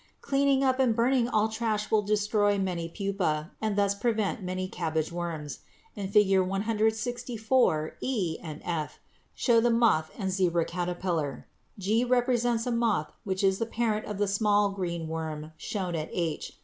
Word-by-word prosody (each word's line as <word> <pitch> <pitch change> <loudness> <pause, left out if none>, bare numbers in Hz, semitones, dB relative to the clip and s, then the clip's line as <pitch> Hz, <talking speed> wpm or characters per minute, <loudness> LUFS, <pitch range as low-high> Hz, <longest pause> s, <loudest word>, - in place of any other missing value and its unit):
Cleaning 275 -1 +2
up 260 -1 +2
and 250 -4 +3
burning 245 +1 +3
all 215 -2 +2
trash 220 -1 -2
will 215 - +4
destroy 205 0 +2
many 180 -4 -2
pupæ 180 -5 -2
and 215 -2 0
thus 200 -1 +3
prevent 215 -1 -1
many 185 0 -3
cabbage 160 -3 -2
worms. 165 -4 -4 0.4
In 200 -3 -4
Fig. 195 -2 +4
164 220 -1 0
e 195 -11 -1
and 155 -2 -7
f 160 -4 -3 0.4
show 235 -3 +4
the 240 - +3
moth 230 -10 +3
and 190 -3 -2
zebra 175 -3 +1
caterpillar; 175 -5 -2 0.3
g 210 +4 +1
represents 245 -2 +1
a 250 - -1
moth 230 -9 0
which 190 0 -2
is 190 0 +3
the 230 - -1
parent 225 -2 -1
of 210 - -4
the 205 0 +1
small 205 0 +2
green 170 -4 -3
worm 160 -1 -5
shown 185 +1 -3
at 155 -1 -3
h. 165 -3 -3
200 Hz, 160 wpm, -28 LUFS, 175-225 Hz, 0.4 s, will